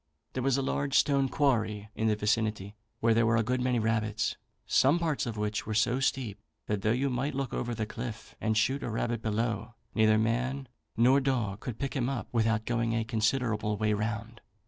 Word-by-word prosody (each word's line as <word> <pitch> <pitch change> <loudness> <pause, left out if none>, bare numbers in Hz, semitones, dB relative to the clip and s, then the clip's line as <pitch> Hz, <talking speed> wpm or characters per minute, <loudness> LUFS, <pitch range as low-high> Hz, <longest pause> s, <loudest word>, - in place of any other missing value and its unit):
There 130 - -2
was 135 +1 +2
a 135 - 0
large 140 +1 -1
stone 140 -2 +3
quarry 110 -7 0
in 110 - 0
the 110 - +3
vicinity, 105 -1 -1 0.3
where 115 0 +4
there 115 0 +3
were 115 0 +3
a 115 - +3
good 125 +3 0
many 125 -1 +1
rabbits, 110 -1 0 0.3
some 140 +6 +4
parts 160 -6 -1
of 115 -2 -4
which 105 0 -2
were 110 - -2
so 120 +4 +2
steep, 130 -6 -1 0.3
that 105 -2 -1
though 110 - +1
you 130 +4 +1
might 135 +3 -1
look 135 -2 -2
over 120 -1 -2
the 110 - -2
cliff, 115 +1 -7
and 110 -1 +1
shoot 130 +6 +2
a - - -3
rabbit 115 0 -1
below, 115 +1 -2 0.2
neither 110 -1 +4
man 125 +5 0 0.3
nor 125 +4 +5
dog 120 -7 -1
could 120 -2 -6
pick 140 0 -3
him 130 -2 0
up 135 -5 -4
without 115 -1 +1
going 115 -1 0
a 115 - +1
considerable 110 -2 0
way 105 +1 +1
round. 110 +2 -3
115 Hz, 205 wpm, -29 LUFS, 110-130 Hz, 0.3 s, nor